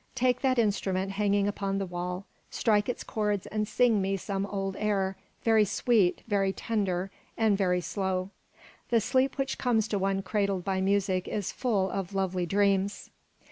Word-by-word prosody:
Take 250 0 +2
that 260 -2 +2
instrument 195 -3 0
hanging 200 0 +1
upon 195 -1 -2
the 195 - -1
wall, 180 +1 -4 0.2
strike 210 -2 +1
its 245 - -3
cords 210 -3 -1
and 215 0 -2
sing 235 -4 +3
me 195 +1 0
some 195 +1 -3
old 195 -1 -3
air, 195 -2 0 0.3
very 220 -2 +5
sweet, 210 -2 +2
very 200 -3 +2
tender, 195 -3 -2 0.3
and 220 -3 +3
very 180 -2 +1
slow. 190 0 -2 0.6
The 235 - +4
sleep 260 +5 +1
which 270 -1 -2
comes 225 -4 +2
to 205 - 0
one 195 0 0
cradled 200 -1 0
by 190 -1 0
music 190 -1 +1
is 205 -3 -2
full 200 -7 0
of 195 0 -4
lovely 185 -2 0
dreams." 200 +1 +1
200 Hz, 165 wpm, -28 LUFS, 190-215 Hz, 0.6 s, very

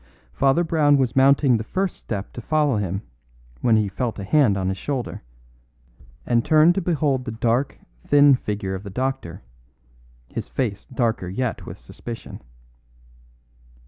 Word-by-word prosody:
Father 140 +5 +2
Brown 150 -3 +3
was 130 -4 0
mounting 135 -1 +4
the 110 - -4
first 190 - -2
step 100 -3 -6
to 120 - -7
follow 150 -1 +1
him 100 0 -3 0.6
when 115 -2 +4
he 105 -2 +2
felt 110 +3 -3
a 100 - -5
hand 110 -2 +3
on 95 -1 -1
his 95 - -3
shoulder, 135 -5 -4 1.0
and 120 -1 +2
turned 155 +3 +5
to 195 - -1
behold 150 -6 0
the 120 - -5
dark, 115 +4 0 0.3
thin 145 -1 +6
figure 105 -6 -2
of 95 - -4
the 100 - -8
doctor, 130 -5 -4 0.8
his - - -6
face 110 -7 -3
darker 115 -7 -1
yet 115 +6 -3
with - - -8
suspicion. 115 -3 -9
125 Hz, 150 wpm, -23 LUFS, 105-145 Hz, 1.0 s, thin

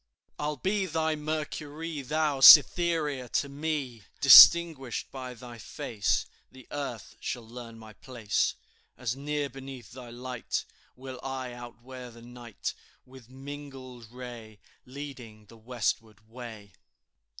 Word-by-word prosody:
"I'll 150 0 -2
be 190 +5 -1
thy 160 -1 -1
Mercury, 155 0 -5
Thou, 150 +1 -1
Cytherea 150 -3 +6
to 140 - +1
me, 140 -5 -4 0.2
Distinguished 160 -8 +7
by 130 -2 -7
thy 120 0 -11
face 105 -3 -2 0.3
The 130 -2 -15
earth 130 -9 -6
shall 120 -2 -5
learn 115 -1 -10
my 110 -1 -13
place. 115 -4 -2 0.4
As 125 -1 -3
near 145 +1 -3
beneath 135 -1 -11
thy 125 0 -11
light 125 +1 -5 0.3
Will 130 0 -9
I 130 -2 -5
outwear 120 +1 -10
the 115 0 -15
night, 120 -2 -7 0.3
With 130 -2 -16
mingled 130 -3 -10
ray 120 -4 -10 0.3
Leading 125 -6 -10
the 115 +2 -17
westward 110 -2 -4
way." 110 -4 -11
130 Hz, 120 wpm, -28 LUFS, 120-145 Hz, 0.4 s, Distinguished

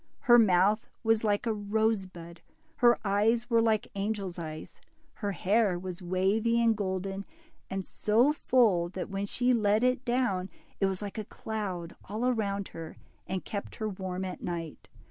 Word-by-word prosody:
Her 240 -3 +7
mouth 205 +1 +4 0.2
was 225 -1 +2
like 205 +2 +1
a 225 - +1
rose 215 -1 0
bud, 170 -2 -12 0.4
her 240 -1 +5
eyes 225 +4 +2
were 230 0 +5
like 220 -2 +2
angels' 195 -3 -3
eyes, 155 -1 -7 0.3
her 205 -2 -3
hair 200 0 +2
was 180 0 -6
wavy 195 +6 +1
and 230 -1 +4
golden, 195 -1 -3 0.5
and 190 -1 -3
so 235 +8 +2
full, 215 - +3
that 185 +1 -6
when 195 +1 -2
she 250 +4 +2
let 215 -1 +2
it 255 0 +2
down 240 -7 0 0.3
it 195 - +3
was 190 +1 -3
like 205 +2 -5
a - - -3
cloud 190 -7 -5
all 220 +5 -2
around 200 -5 -1
her, 165 -1 -9 0.3
and 190 0 -3
kept 200 -1 -5
her 215 - -3
warm 190 -1 -4
at 185 - -6
night. 165 -3 -5
205 Hz, 165 wpm, -29 LUFS, 185-225 Hz, 0.5 s, Her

